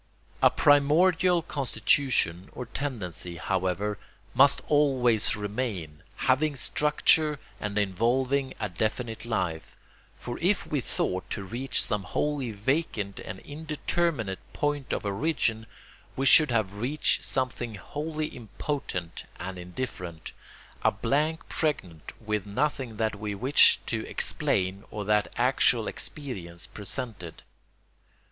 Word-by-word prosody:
A - - +8
primordial 165 +5 +4
constitution 125 - +1
or 125 - -5
tendency, 105 - -5
however, 95 +3 -1 0.3
must 140 +1 +5
always 130 -7 +3
remain, 105 -7 -4
having 145 +3 +2
structure 150 +3 +3 0.2
and 105 0 -3
involving 125 +7 +1
a 105 - -1
definite 110 +5 -2
life; 90 -8 -2 0.4
for 120 - -6
if 185 +4 +1
we 145 -3 -1
thought 95 -5 -2
to 100 - -3
reach 120 +7 +1
some 105 -1 0
wholly 135 +7 -1
vacant 105 - -1
and 95 - -7
indeterminate 150 - -2
point 145 -2 -1
of - - -2
origin, 110 0 0 0.5
we 135 - -1
should 150 +3 +7
have 110 -5 +1
reached 125 +9 +1
something 120 -3 -1
wholly 155 - -4
impotent 120 - -5
and 95 +1 -5
indifferent, 90 -3 -6 0.5
a - - +5
blank 155 +6 0
pregnant 90 - -2
with 105 -2 -2
nothing 130 0 -1
that 110 -2 -1
we 105 -1 -3
wished 130 +8 +5
to - - -2
explain 95 +1 0
or 105 -1 -5
that 105 0 +2
actual - - +3
experience 90 - -4
presented. 105 - -4
115 Hz, 115 wpm, -28 LUFS, 100-145 Hz, 0.5 s, A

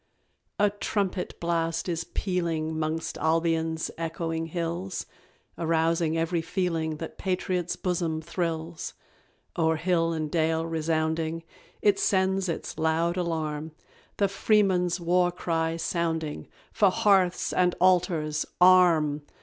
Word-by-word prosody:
_ 205 - +5
A 205 - +2
trumpet 200 -2 -2
blast 165 0 -1
is 165 -2 -2
pealing 165 -4 -2
'Mongst 160 0 -2
Albion's 160 0 0
echoing 165 0 -3
hills, 170 +3 -3 0.5
Arousing 165 0 +1
every 165 +1 0
feeling 165 -2 -1
That 165 - -8
patriot's 180 -2 -1
bosom 170 -3 -1
thrills: 165 0 -4 0.6
O'er 160 -1 +3
hill 165 0 +1
and 155 -2 -3
dale 160 0 +1
resounding, 160 0 -1 0.4
It 205 -1 +4
sends 190 -1 +1
its 165 - -4
loud 160 +2 +1
alarm; 160 -3 -2 0.4
The 200 - +3
Freeman's 190 -3 +2
war 175 +1 +2
cry 165 -2 -1
sounding, 165 -2 -2 0.2
"For 200 - +4
Hearths 185 -2 +2
and 180 -1 +2
Altars, 170 -4 +2
arm!" 170 -5 +5
165 Hz, 115 wpm, -27 LUFS, 160-180 Hz, 0.6 s, _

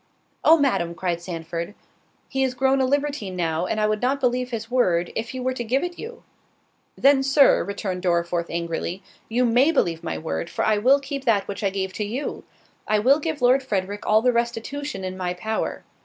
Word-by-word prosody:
"Oh, 325 - +7
Madam," 175 - 0
cried 170 0 -2
Sandford, 170 +2 -5 0.5
"he 270 - -2
is 260 -1 0
grown 265 +1 +2
a - - +3
libertine 280 -8 -1
now, 170 0 -1
and 215 - -1
I 215 - +2
would 215 0 0
not 265 +3 +1
believe 250 -1 0
his 230 -1 -5
word, 180 -9 +2
if 230 +1 -3
he 260 - -5
were 255 +1 -1
to 245 - -4
give 255 +4 0
it 350 -1 -5
you." 465 +2 -8 0.7
"Then, 275 0 +5
Sir," 275 +1 +5
returned 195 -2 -4
Dorriforth 170 -1 0
angrily, 170 +2 -3 0.3
"you 245 +3 +2
may 245 +6 +4
believe 170 - 0
my - - -3
word, 165 +1 -4
for - - -1
I 215 -1 +3
will 265 +6 +5
keep 275 0 -6
that 210 -5 +2
which 200 +1 -5
I 200 - +3
gave 190 -1 -3
to 210 - -3
you. 240 +8 -4 0.4
I 215 - +3
will 260 +8 +4
give 310 -3 -3
Lord 255 +2 +5
Frederick 205 -4 -3
all 215 +1 +4
the 250 -1 +3
restitution 235 0 -3
in 185 0 -4
my 180 -1 -2
power. 220 +4 -3
225 Hz, 205 wpm, -23 LUFS, 185-265 Hz, 0.7 s, Oh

